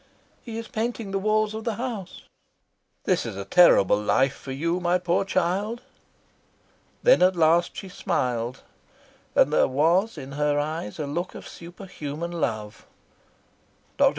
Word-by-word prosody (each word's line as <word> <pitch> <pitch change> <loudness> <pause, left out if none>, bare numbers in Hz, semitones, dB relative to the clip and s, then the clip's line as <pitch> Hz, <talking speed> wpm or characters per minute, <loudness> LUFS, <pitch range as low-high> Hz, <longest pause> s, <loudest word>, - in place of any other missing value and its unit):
"He 225 -3 -7
is 230 -1 -6
painting 225 -2 -3
the 195 - 0
walls 215 +1 +1
of 220 0 -5
the 230 -2 -2
house." 230 -6 -6 0.8
"This - - +1
is - - -5
a 100 0 -5
terrible 105 - +5
life 130 +5 +2
for 135 - -9
you, 165 +6 -1
my 180 0 +2
poor 175 0 0
child." 195 +6 -1 1.2
Then - - +6
at 185 +1 +5
last 170 +1 +3
she 195 - -6
smiled, 125 - -2 0.7
and 150 - +4
there - - +4
was 170 +11 +2
in 135 +1 -8
her 145 +1 0
eyes 150 -7 -3
a 150 - -3
look 170 +6 -4
of - - -9
superhuman 170 -2 -7
love. 110 -10 -4 1.1
Dr. - - +6
175 Hz, 150 wpm, -25 LUFS, 145-200 Hz, 1.2 s, Then